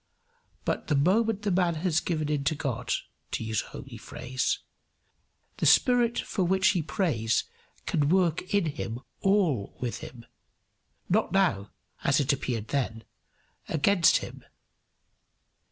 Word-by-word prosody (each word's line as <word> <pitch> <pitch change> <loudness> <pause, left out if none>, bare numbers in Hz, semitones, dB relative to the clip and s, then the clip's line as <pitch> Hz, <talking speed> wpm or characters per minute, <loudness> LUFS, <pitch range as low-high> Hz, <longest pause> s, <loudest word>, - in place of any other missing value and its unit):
But - - -2
the 150 - +2
moment 205 +8 +2
the 205 - 0
man 175 -2 +2
has 160 0 +1
given 155 -4 -2
in 145 -2 0
to 155 - +2
God 125 -4 -3 0.4
to - - -3
use 110 -1 -1
a - - -11
homely - - -9
phrase 130 +1 -2 1.0
the - - +1
spirit 245 -3 +4
for 190 - -1
which 190 +1 +3
he 185 -5 +1
prays 150 - 0 0.4
can 145 -1 +1
work 180 -1 +1
in 200 -3 +2
him 125 -6 -4 0.2
all 180 - +1
with 120 -2 -3
him, 120 -2 -10 0.8
not 210 0 +1
now 170 - +2 0.3
(as 140 +1 +3
it 145 0 +2
appeared 115 -5 -3
then) 115 -5 -2 0.7
against 165 +3 +4
him. - - -11
155 Hz, 135 wpm, -28 LUFS, 130-190 Hz, 1.0 s, spirit